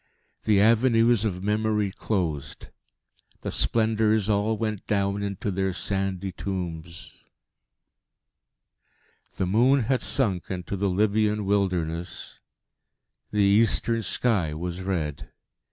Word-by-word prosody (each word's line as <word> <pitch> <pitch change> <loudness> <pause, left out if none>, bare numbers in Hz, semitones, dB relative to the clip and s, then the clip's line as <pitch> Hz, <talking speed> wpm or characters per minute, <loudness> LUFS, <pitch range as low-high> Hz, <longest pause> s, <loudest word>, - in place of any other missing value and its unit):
The 105 -2 +4
avenues 115 +1 +4
of 90 -3 -2
Memory 105 -1 0
closed; 85 -9 -3 0.7
the - - -4
Splendours 110 -2 +2
all 105 +2 +1
went 110 -2 -3
down 100 -1 0
into 100 0 -3
their 95 0 -1
sandy 95 0 -2
tombs.... 85 -3 -6 2.2
The - - -1
moon 125 +8 +3
had 130 +3 0
sunk 100 - 0
into 90 0 -4
the 100 0 0
Libyan 105 +2 +1
wilderness; 90 -4 -2 0.9
the 105 -1 +1
eastern 115 +3 +2
sky 95 -7 0
was 90 +3 -5
red. 85 -7 -3
100 Hz, 105 wpm, -25 LUFS, 90-110 Hz, 2.2 s, The